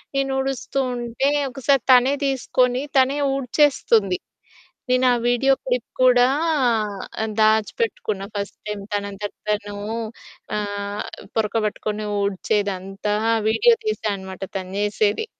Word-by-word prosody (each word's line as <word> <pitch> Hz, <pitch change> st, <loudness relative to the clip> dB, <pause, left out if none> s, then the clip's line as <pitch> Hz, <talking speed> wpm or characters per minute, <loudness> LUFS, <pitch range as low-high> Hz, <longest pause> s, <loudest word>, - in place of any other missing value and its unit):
నేను 275 Hz, 0 st, +1 dB
ఊడుస్తూ 270 Hz, 0 st, -2 dB, 0.2 s
ఉంటే, 240 Hz, +3 st, -1 dB, 0.2 s
ఒకసారి 270 Hz, 0 st, +1 dB
తనే 255 Hz, +2 st, +6 dB
తీసుకొని 255 Hz, -1 st, +1 dB, 0.2 s
తనే 265 Hz, +2 st, +4 dB, 0.2 s
ఊడ్చేస్తుంది. 250 Hz, -, +2 dB, 0.7 s
నేను 255 Hz, +1 st, +3 dB
ఆ -, -, +3 dB
వీడియో 245 Hz, +3 st, +3 dB
క్లిప్ -, -, -1 dB
కూడా 250 Hz, -1 st, +6 dB, 1.0 s
ఆహ్, 220 Hz, -, -2 dB
దాచిపెట్టుకున్నా 215 Hz, -, +1 dB
ఫస్ట్ 200 Hz, 0 st, -4 dB
టైమ్ 210 Hz, -1 st, -4 dB
తనంతట 200 Hz, 0 st, -3 dB, 0.2 s
తను 205 Hz, -1 st, -1 dB, 0.8 s
ఆహ్, 205 Hz, 0 st, -3 dB, 0.3 s
పొరక 220 Hz, -1 st, 0 dB
పట్టుకొని 210 Hz, 0 st, -3 dB, 0.2 s
ఊడ్చేదంతా 200 Hz, 0 st, -1 dB, 0.3 s
వీడియో 470 Hz, -, +5 dB
తీసా 430 Hz, -, -1 dB
అనమాట 190 Hz, 0 st, -9 dB, 0.2 s
తను 185 Hz, 0 st, -7 dB
జేసేది. 210 Hz, -, +1 dB
220 Hz, 110 wpm, -22 LUFS, 205-260 Hz, 1.0 s, తనే